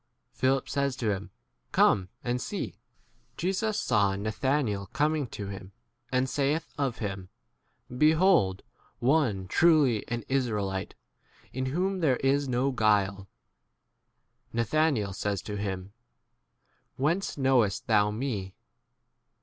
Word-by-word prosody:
Philip 130 Hz, +1 st, +1 dB
says 140 Hz, -2 st, 0 dB
to 115 Hz, -4 st, -1 dB
him, 100 Hz, 0 st, -4 dB, 0.4 s
Come 95 Hz, -2 st, +4 dB, 0.2 s
4? 120 Hz, -, -1 dB
and 125 Hz, 0 st, -1 dB
see. -, -, -5 dB, 0.6 s
Jesus 200 Hz, +4 st, 0 dB
saw 100 Hz, -4 st, +2 dB
Nathanael 110 Hz, 0 st, -1 dB
coming 150 Hz, +2 st, 0 dB
to 105 Hz, -2 st, -6 dB
him, 95 Hz, -1 st, -8 dB, 0.4 s
and 130 Hz, 0 st, +2 dB
saith 145 Hz, +4 st, -1 dB
of 135 Hz, -5 st, -1 dB
him, 100 Hz, -4 st, -5 dB, 0.7 s
Behold 155 Hz, -, +4 dB, 0.3 s
[one] 120 Hz, -8 st, +1 dB
truly 145 Hz, -, +4 dB
an 120 Hz, -1 st, -3 dB
Israelite, 105 Hz, -8 st, -1 dB, 0.6 s
in 130 Hz, +1 st, -2 dB
43 130 Hz, -, -3 dB
whom 190 Hz, +2 st, 0 dB
there 145 Hz, -7 st, +3 dB
is 140 Hz, +1 st, +1 dB
no 130 Hz, +2 st, +1 dB
guile. 100 Hz, -5 st, +1 dB, 1.2 s
Na 115 Hz, 0 st, 0 dB
thanael 125 Hz, -6 st, +1 dB
says 100 Hz, 0 st, -2 dB
to 105 Hz, -, -5 dB
him, 100 Hz, -1 st, -4 dB, 1.0 s
Whence 165 Hz, +9 st, 0 dB
knowest 130 Hz, -5 st, +2 dB
thou 105 Hz, -2 st, +3 dB
me 105 Hz, -5 st, -3 dB
125 Hz, 120 wpm, -28 LUFS, 100-140 Hz, 1.2 s, Come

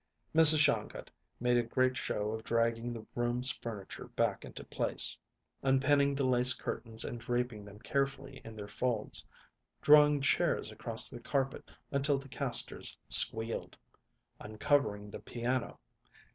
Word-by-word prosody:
Mrs. 160 Hz, -1 st, +11 dB
Shongut 150 Hz, -1 st, -1 dB, 0.3 s
made 125 Hz, 0 st, -1 dB
a -, -, +1 dB
great 130 Hz, +2 st, -2 dB
show 105 Hz, -4 st, -4 dB
of 110 Hz, 0 st, -8 dB
dragging 115 Hz, +1 st, -3 dB
the 115 Hz, -2 st, -10 dB
room's 120 Hz, +2 st, 0 dB
furniture 105 Hz, -5 st, -10 dB
back -, -, -4 dB
into -, -, -11 dB
place; -, -, +2 dB, 0.5 s
unpinning 140 Hz, +1 st, 0 dB
the 140 Hz, -1 st, -3 dB
lace 125 Hz, 0 st, +5 dB
curtains 110 Hz, -2 st, -3 dB
and 120 Hz, -, -8 dB
draping 120 Hz, -3 st, -5 dB
them 100 Hz, 0 st, -15 dB
carefully 135 Hz, +2 st, -5 dB
in 115 Hz, -1 st, -13 dB
their 105 Hz, -1 st, -10 dB
folds; 110 Hz, +1 st, -3 dB, 0.6 s
drawing 150 Hz, -1 st, +3 dB
chairs 140 Hz, -, -1 dB
across -, -, 0 dB
the -, -, -8 dB
carpet 135 Hz, -1 st, -5 dB, 0.2 s
until 140 Hz, 0 st, 0 dB
the 135 Hz, 0 st, -12 dB
casters -, -, 0 dB
squealed; 115 Hz, +1 st, +4 dB, 0.6 s
uncovering 105 Hz, -1 st, -3 dB
the -, -, -10 dB
piano. 120 Hz, +1 st, -6 dB
125 Hz, 135 wpm, -29 LUFS, 115-135 Hz, 0.6 s, Mrs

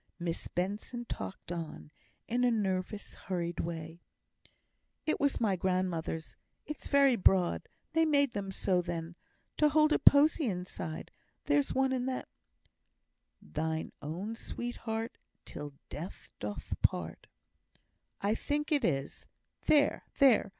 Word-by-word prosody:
Miss 170 Hz, -2 st, -3 dB
Benson 205 Hz, +6 st, -3 dB
talked 95 Hz, -, -6 dB
on, 165 Hz, -3 st, -5 dB, 0.4 s
in 245 Hz, +2 st, +1 dB
a 245 Hz, -, +5 dB
nervous 200 Hz, -2 st, -1 dB
hurried 175 Hz, -2 st, -3 dB
way: 165 Hz, 0 st, -4 dB, 1.0 s
"It 310 Hz, -, +1 dB
was 285 Hz, -1 st, +2 dB
my 210 Hz, -5 st, +2 dB
grandmother's; 180 Hz, -3 st, -1 dB, 0.3 s
it's 300 Hz, -, -5 dB
very 280 Hz, -3 st, +5 dB
broad; 185 Hz, -4 st, +3 dB, 0.2 s
they 325 Hz, 0 st, +4 dB
made 285 Hz, -5 st, +3 dB
them 200 Hz, -1 st, -3 dB
so 185 Hz, -1 st, +1 dB
then, 170 Hz, -1 st, -4 dB, 0.4 s
to 300 Hz, -, +5 dB
hold 305 Hz, +1 st, +5 dB
a -, -, +3 dB
posy 290 Hz, 0 st, +6 dB
inside: 180 Hz, -4 st, -4 dB, 0.3 s
there's 290 Hz, -1 st, +2 dB
one 265 Hz, 0 st, +3 dB
in 255 Hz, 0 st, 0 dB
that; 260 Hz, -1 st, -2 dB, 1.2 s
Thine 160 Hz, +1 st, -2 dB
own 180 Hz, +9 st, -4 dB
sweetheart 230 Hz, -1 st, -4 dB, 0.3 s
Till 145 Hz, -1 st, -7 dB
death 170 Hz, +6 st, -7 dB
doth 105 Hz, 0 st, -4 dB
part, -, -, 0 dB, 0.9 s
I 205 Hz, +2 st, +2 dB
think 295 Hz, +6 st, -1 dB
it 290 Hz, -2 st, +3 dB
is. 135 Hz, -3 st, -1 dB, 0.4 s
There, 290 Hz, -1 st, +4 dB
there! 260 Hz, -8 st, +6 dB
200 Hz, 125 wpm, -32 LUFS, 170-265 Hz, 1.2 s, posy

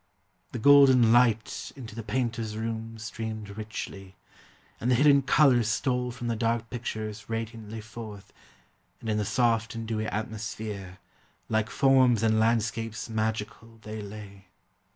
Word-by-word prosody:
The -, -, -4 dB
golden 130 Hz, -2 st, +7 dB
light 115 Hz, -3 st, +2 dB
into 120 Hz, -5 st, -9 dB
the 115 Hz, -, -5 dB
painter's 115 Hz, -1 st, -2 dB
room 115 Hz, 0 st, -4 dB
Streamed 110 Hz, -2 st, -6 dB
richly, 100 Hz, -3 st, -7 dB, 0.6 s
and 120 Hz, -, -1 dB
the 125 Hz, -, +5 dB
hidden 140 Hz, +2 st, +5 dB
colors 135 Hz, -4 st, +4 dB
stole 125 Hz, +1 st, 0 dB
From 120 Hz, 0 st, -7 dB
the 115 Hz, -1 st, 0 dB
dark 115 Hz, +1 st, -1 dB
pictures 110 Hz, -3 st, -5 dB
radiantly 115 Hz, -1 st, -5 dB
forth, 105 Hz, -2 st, -10 dB, 0.7 s
And 115 Hz, -, -6 dB
in 105 Hz, 0 st, +1 dB
the 105 Hz, -, -1 dB
soft 115 Hz, -1 st, +1 dB
and 115 Hz, -1 st, -5 dB
dewy 110 Hz, -1 st, -2 dB
atmosphere 105 Hz, -3 st, -5 dB, 0.5 s
Like 110 Hz, -1 st, +1 dB
forms 130 Hz, -4 st, +4 dB
and 110 Hz, -1 st, +3 dB
landscapes 115 Hz, 0 st, 0 dB
magical 110 Hz, +1 st, -3 dB
they 110 Hz, 0 st, -6 dB
lay. 100 Hz, -2 st, -10 dB
115 Hz, 135 wpm, -28 LUFS, 110-120 Hz, 0.7 s, golden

